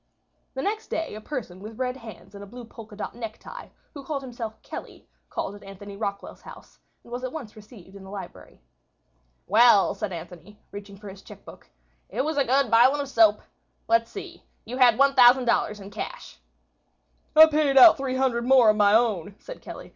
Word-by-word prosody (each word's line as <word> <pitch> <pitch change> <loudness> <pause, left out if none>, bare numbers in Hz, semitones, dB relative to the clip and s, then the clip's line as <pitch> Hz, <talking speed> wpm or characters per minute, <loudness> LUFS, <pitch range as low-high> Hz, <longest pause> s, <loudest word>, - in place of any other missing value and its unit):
The 265 - -4
next 430 +2 -3
day 325 0 -4
a 215 - -8
person 215 -8 -7
with 215 +3 -10
red 255 -1 -2
hands 225 -5 -13
and 200 0 -10
a - - -11
blue 245 +3 -11
polka 225 -2 -13
dot 210 - -6
necktie, 235 - -9 0.3
who 280 - -10
called 275 0 -5
himself 235 -4 -8
Kelly, - - -10 0.2
called 195 - -4
at 205 - -13
Anthony 200 +1 -11
Rockwall's 200 -1 -6
house, - - -15 0.2
and 235 - -18
was 245 +1 -6
at 255 - -4
once 260 -9 -9
received 210 -3 -15
in 195 - -12
the 190 - -12
library. 195 - -11 0.8
"Well," 215 0 +4
said 210 -2 -5
Anthony, 180 +4 -10
reaching 200 -1 -10
for 205 +1 -12
his 195 0 -11
chequebook, - - -15 0.4
"it - - -2
was 310 -1 -3
a 280 - +3
good 265 0 +1
bilin' 250 +5 +5
of 280 -1 -4
soap. 220 -4 +3 0.5
Let's 230 0 +2
see—you 245 +3 -10
had 245 -4 +5
$5,000 250 -5 +4
in 200 0 -11
cash." - - -8 1.0
"I 315 +1 +10
paid 300 -3 +1
out 290 +5 +9
$300 260 -2 -1
more 250 -3 +5
of 215 - -4
my 205 0 +4
own," 205 -5 0
said - - -11
Kelly. - - -10
230 Hz, 185 wpm, -24 LUFS, 205-265 Hz, 1.0 s, I